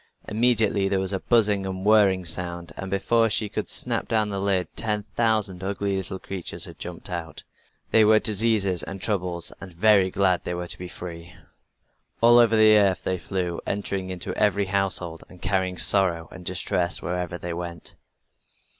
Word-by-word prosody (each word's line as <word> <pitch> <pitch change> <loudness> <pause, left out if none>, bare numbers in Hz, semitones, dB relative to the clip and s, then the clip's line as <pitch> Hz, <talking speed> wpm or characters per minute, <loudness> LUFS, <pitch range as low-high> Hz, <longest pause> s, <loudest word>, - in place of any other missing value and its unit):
Immediately 110 -3 +2
there 95 -1 +1
was 95 +1 -1
a 95 - -1
buzzing, 100 -5 +1
whirring 100 -3 +4
sound, 85 0 -4
and 95 - -6
before 115 +4 +2
she 105 0 +1
could - - -4
snap - - -1
down 110 -2 +1
the 100 -1 -3
lid 95 -3 +1
ten 105 -2 -2
thousand 110 -5 0
ugly 100 0 -2
little 95 0 -4
creatures 95 -1 -4
had - - -12
jumped - - -7
out. 85 -2 -6 0.5
They 110 - +6
were 110 +1 +6
diseases 105 -4 +2
and 95 - -7
troubles, 90 -4 -1
and 95 - -9
very 95 +1 +4
glad 95 -1 +1
they 90 - -3
were 90 0 -5
to - - -6
be 90 - -6
free. 85 -1 -9 0.8
All 120 +1 +7
over 115 -2 +4
the 110 0 +7
earth 100 -2 +2
they 95 -1 -1
flew, 90 -2 -3
entering 100 -2 -3
into 90 -2 -4
every 100 -1 +1
household, 95 -4 -2
and 90 - -15
carrying 95 0 -1
sorrow 85 -5 +1
and 95 - -11
distress 90 0 -1
wherever 90 0 -3
they 85 -1 -5
went. 85 -1 -7
95 Hz, 170 wpm, -24 LUFS, 90-105 Hz, 0.8 s, All